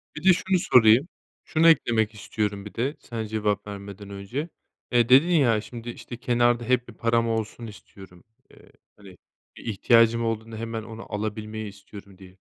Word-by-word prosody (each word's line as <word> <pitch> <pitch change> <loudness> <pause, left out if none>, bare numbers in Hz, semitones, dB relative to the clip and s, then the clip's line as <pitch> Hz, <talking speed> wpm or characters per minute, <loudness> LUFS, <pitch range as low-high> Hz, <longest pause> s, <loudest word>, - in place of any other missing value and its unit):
Bir 155 - -8
de 190 0 +7
şunu 185 +1 0
sorayım, 120 0 +5 0.4
şunu 165 0 +2
eklemek 115 -8 +2
istiyorum 105 -1 -3
bir 105 - -10
de 135 +6 -2
sen 115 -2 -6
cevap 105 -2 -2
vermeden 100 0 -9
önce: 100 - -5 0.4
Eee, 120 -2 +3
dedin 135 +6 +7
ya 130 -11 +3
şimdi, 120 +1 -9
işte, 120 0 -8
kenarda 120 -1 +1
hep 125 +1 0
bir 115 - -11
param 115 0 +1
olsun 115 +1 -3
istiyorum. 95 -4 -14 0.3
Eee, - - -20 0.3
hani, 95 -3 -15 0.4
bir - - -12
ihtiyacım 115 +2 +3
olduğunda 115 0 -4
hemen 115 0 -5
onu 110 0 -10
alabilmeyi 110 +1 -4
istiyorum, 100 -1 -14
diye. 95 -1 -16
115 Hz, 165 wpm, -25 LUFS, 105-120 Hz, 0.4 s, de